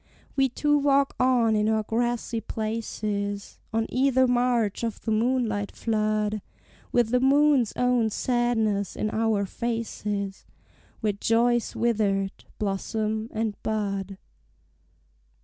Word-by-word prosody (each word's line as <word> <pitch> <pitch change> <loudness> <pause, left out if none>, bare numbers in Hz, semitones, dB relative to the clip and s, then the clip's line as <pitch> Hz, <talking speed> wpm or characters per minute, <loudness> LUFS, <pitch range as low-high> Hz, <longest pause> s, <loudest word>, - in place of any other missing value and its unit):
We 270 -1 +3
two 295 +4 +2
walk 280 -1 +2
on 245 -3 +3
in 210 0 +2
our 220 -1 +1
grassy 235 +1 -1
places, 210 -2 -3
On 225 0 0
either 260 0 +3
marge 240 -4 +1
of 230 -2 -2
the 225 - -2
moonlit 220 -3 0
flood, 215 -1 0 0.5
With 240 -2 +3
the 250 +1 +3
moon's 275 -2 +4
own 250 -2 +2
sadness 220 -4 0
in 215 - -2
our 220 -2 +1
faces, 210 -3 -3 0.5
Where 215 -2 +1
joy 230 +4 +2
is 235 - -5
withered, 205 -4 0
blossom 215 +2 -2
and 220 -1 -2
bud. 200 -3 -2
225 Hz, 115 wpm, -26 LUFS, 210-245 Hz, 0.5 s, moon's